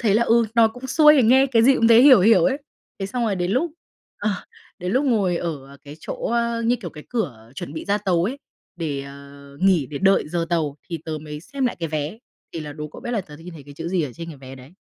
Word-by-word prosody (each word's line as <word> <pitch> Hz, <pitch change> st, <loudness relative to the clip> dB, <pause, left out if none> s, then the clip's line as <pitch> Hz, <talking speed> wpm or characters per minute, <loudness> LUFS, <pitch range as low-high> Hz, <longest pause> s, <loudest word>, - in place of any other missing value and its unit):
thế 215 Hz, -5 st, +2 dB
là, 230 Hz, -, +4 dB
ừ, 230 Hz, 0 st, +3 dB
nó 230 Hz, -1 st, +5 dB
cũng 245 Hz, +3 st, -9 dB
xuôi 300 Hz, +2 st, +6 dB
thì 260 Hz, -, +5 dB
nghe 260 Hz, +4 st, +5 dB
cái 230 Hz, -4 st, +3 dB
gì 270 Hz, +3 st, +6 dB
cũng 230 Hz, -, +3 dB
thấy 230 Hz, +1 st, +7 dB
hiểu 265 Hz, -6 st, +8 dB
hiểu 185 Hz, -3 st, +5 dB
ấy. 270 Hz, +1 st, +1 dB, 0.4 s
Thế 195 Hz, -, -3 dB
xong 240 Hz, +3 st, -2 dB
rồi 200 Hz, -4 st, 0 dB
đến 175 Hz, 0 st, -1 dB
lúc, 300 Hz, +6 st, 0 dB, 0.5 s
ờ, 210 Hz, +1 st, 0 dB, 0.5 s
đến 180 Hz, +2 st, -3 dB
lúc 270 Hz, +3 st, +2 dB
ngồi 200 Hz, -9 st, +1 dB
ở 140 Hz, -5 st, -5 dB
cái 145 Hz, +2 st, -10 dB
chỗ, -, -, -5 dB, 0.2 s
ơ, 235 Hz, 0 st, 0 dB
như 240 Hz, +2 st, +2 dB
kiểu, 185 Hz, -9 st, -8 dB
cái 150 Hz, -1 st, -12 dB
cửa 120 Hz, -, -4 dB
chuẩn 140 Hz, -, -7 dB
bị -, -, -6 dB
ra 205 Hz, +1 st, +1 dB
tàu 180 Hz, -4 st, +1 dB
ấy, 260 Hz, +7 st, -3 dB, 0.4 s
để, 150 Hz, -5 st, -3 dB
ờ, 140 Hz, 0 st, -13 dB
nghỉ 185 Hz, -8 st, +3 dB
để 140 Hz, +2 st, -6 dB
đợi 195 Hz, -5 st, +3 dB
giờ 170 Hz, 0 st, -2 dB
tàu, 155 Hz, -4 st, 0 dB
thì 165 Hz, -, -3 dB
tớ 155 Hz, -1 st, -4 dB
mới 150 Hz, -1 st, -7 dB
xem 260 Hz, -, -3 dB
lại -, -, -3 dB
cái 165 Hz, -, -2 dB
vé, 155 Hz, +6 st, -4 dB, 0.3 s
thì 165 Hz, -, -5 dB
là 150 Hz, -1 st, -7 dB
đố 150 Hz, 0 st, -7 dB
cậu -, -, -12 dB
biết 240 Hz, -, -5 dB
là 230 Hz, -, 0 dB
tớ 150 Hz, -5 st, -12 dB
đ -, -, -16 dB
nhìn 175 Hz, 0 st, -10 dB
thấy 145 Hz, -, -11 dB
cái 145 Hz, 0 st, -13 dB
chữ 165 Hz, +2 st, -5 dB
gì 180 Hz, -2 st, 0 dB
ở 135 Hz, -4 st, -4 dB
trên 170 Hz, 0 st, -8 dB
cái 155 Hz, -, -9 dB
vé 130 Hz, 0 st, -10 dB
đấy? 130 Hz, +5 st, -14 dB
180 Hz, 280 wpm, -22 LUFS, 150-230 Hz, 0.5 s, hiểu